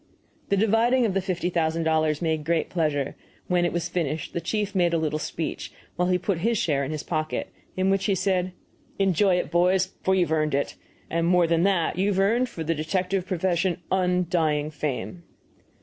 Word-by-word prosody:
The 200 - +2
dividing 225 +4 +3
of 205 - 0
the 195 - +1
fifty 180 -1 -2
thousand 165 -1 0
dollars 155 0 +1
made 160 -2 0
great 165 +1 0
pleasure; 150 -5 -1 0.3
when 175 -1 +2
it 175 - 0
was 170 0 -2
finished 165 -3 -3
the 170 - -2
chief 205 +4 -2
made 175 -3 +2
a - - +3
little 155 -1 -1
speech 160 +1 -4 0.2
while 180 0 +1
he 180 0 +3
put 180 -1 -1
his 230 +5 +1
share 150 -10 +1
in 135 - -3
his 155 -1 -4
pocket, 155 -2 -3 0.3
in 190 +1 +2
which 195 0 +1
he 200 - +2
said, 185 -1 0 0.5
"Enjoy 195 0 +3
it, 180 - -2
boys, 180 +2 +2
for 190 - +2
you've 175 -4 +1
earned 155 -2 +1
it; 140 - -1 0.4
and, 170 0 +1
more 180 -1 +4
than 165 0 +2
that, 180 -3 +1
you've 195 0 +1
earned 235 +6 +2
for 165 - -6
the 165 +1 0
detective 180 +4 -1
profession 180 -1 0
undying 175 -5 +1
fame." 150 +3 -4
175 Hz, 195 wpm, -25 LUFS, 160-190 Hz, 0.5 s, more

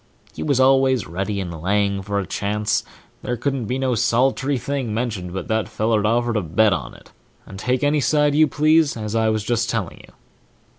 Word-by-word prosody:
He - - -8
was 140 -4 +1
always 130 -2 +3
ready 95 +4 -3
and 85 -4 -5
laying 100 +2 0
for 100 +1 -3
a 100 - -1
chance; 105 +4 -1 0.4
there 125 - -3
couldn't 135 0 -2
be 125 +5 -2
no 130 -1 0
solit'ry 130 +4 +1
thing 130 -4 -3
mentioned 110 -7 -3
but 95 -1 -5
that 110 -2 -1
feller'd 110 -1 0
offer 120 +1 +1
to 105 - 0
bet 95 +5 +2
on 60 -9 -5
it, - - -18 0.3
and 95 - -10
take 125 +4 -1
any 145 +1 +2
side 150 +1 +2
you 155 +1 +5
please, 155 +1 +2
as 105 -1 -5
I 110 -1 +2
was 110 -1 -1
just 120 +1 0
telling 110 -6 -3
you. - - -17
115 Hz, 200 wpm, -21 LUFS, 100-130 Hz, 0.4 s, you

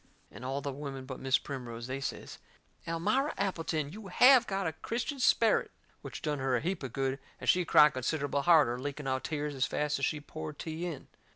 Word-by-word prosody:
And - - -11
all 135 +2 -2
the 140 -1 -4
women 135 -1 -6
but 130 -1 -7
Mis' 135 0 +3
Primrose, 120 -4 -6
they 130 +2 -4
says: - - -5 0.5
"Elmira 215 - 0
Appleton, 165 -6 -1
you 210 -1 -9
HAVE 250 +5 +6
got 195 -1 -1
a 160 - -1
Christian 245 - -4
sperrit!" 230 -3 +3 0.3
Which - - -8
done 150 -3 -1
her 130 -1 +1
a - - +2
heap 185 +3 -2
of 130 -3 -5
good, 135 +2 -1 0.2
and - - -7
she 180 -1 +4
cried 150 -1 +6
considerable 140 +2 -1
harder, 145 -7 +4
leaking 145 +2 -5
out 130 0 -1
tears 150 -2 -2
as 135 0 0
fast 150 -1 -1
as 135 - +2
she 150 - -1
poured 155 0 -7
tea 165 +2 -4
in. 160 -6 -7
150 Hz, 205 wpm, -31 LUFS, 135-170 Hz, 0.5 s, HAVE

